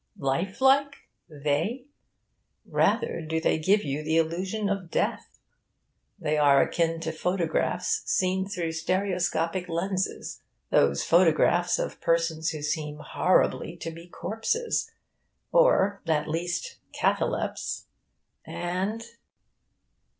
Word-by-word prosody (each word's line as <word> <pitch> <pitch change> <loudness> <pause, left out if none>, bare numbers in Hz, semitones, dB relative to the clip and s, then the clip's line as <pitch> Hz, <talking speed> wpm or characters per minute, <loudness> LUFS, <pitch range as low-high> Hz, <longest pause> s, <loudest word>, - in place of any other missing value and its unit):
Lifelike? 265 - +2 0.3
They? 155 - -1 0.8
Rather - - +1
do 160 +1 -2
they 160 - +1
give 200 +6 +3
you 145 +1 -2
the 160 +1 0
illusion 185 +6 0
of 195 -4 -2
death. - - -2 0.8
They 150 0 0
are 140 -2 +6
akin 165 -1 0
to 160 0 -2
photographs 175 +1 0
seen 190 +1 +1
through 175 -5 -2
stereoscopic 180 0 -1
lenses 185 +3 -2 0.3
those 70 0 +3
photographs 175 +1 +4
of - - -4
persons 165 -1 +1
who 155 -2 -5
seem 150 0 -2
horribly 170 +2 +1
to 165 - -5
be 165 +1 -11
corpses, 225 - -2 0.6
or, - - +4
at 155 -2 +1
least, 175 - -3 0.2
catalepts; - - -1 0.6
and... 190 +6 -3
170 Hz, 105 wpm, -27 LUFS, 160-190 Hz, 0.8 s, are